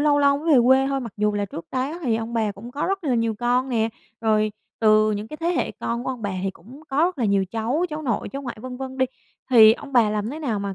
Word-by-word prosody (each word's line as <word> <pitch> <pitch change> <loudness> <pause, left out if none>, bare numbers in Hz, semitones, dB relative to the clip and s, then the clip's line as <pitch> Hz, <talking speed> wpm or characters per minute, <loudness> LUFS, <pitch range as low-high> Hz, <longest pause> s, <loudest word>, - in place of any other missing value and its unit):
lâu 290 -1 +3
lâu 280 0 +4
mới 320 +2 +1
về - - +7
quê 265 +1 +5
thôi, 275 0 -1
mặc 230 -5 -7
dù 210 0 +1
là 205 0 -1
trước 175 -4 -8
đó 270 +6 -2
thì 235 -6 +1
ông 225 +1 -5
bà 220 -3 0
cũng 210 +5 -10
có 285 +4 -2
rất 390 -2 -2
là 265 - +1
nhiều 230 -1 0
con 245 +3 0
nè, 225 -3 +1 0.3
rồi 215 -1 +2 0.3
từ 215 -1 +5
những 210 +1 -4
cái 305 - -7
thế 330 - -4
hệ 355 - 0
con 235 +1 -4
của - - -1
ông 250 -3 -6
bà 205 - -1
thì 195 - -1
cũng 235 - -15
có 270 - -4
rất 360 -5 -1
là 235 - +1
nhiều 200 -2 +2
cháu, 235 +9 -1
cháu 305 +1 -4
nội, 235 -7 -1
cháu 275 +1 -6
ngoại, 240 -3 -6
vân 255 0 -7
vân 265 0 -7
đi. 260 - +3 0.4
Thì 220 -3 +8
ông 275 +4 -8
bà 230 -4 +4
làm 210 +2 -2
thế 300 - -6
nào 245 -9 -2
mà 200 -1 -4
240 Hz, 290 wpm, -23 LUFS, 215-275 Hz, 0.4 s, Thì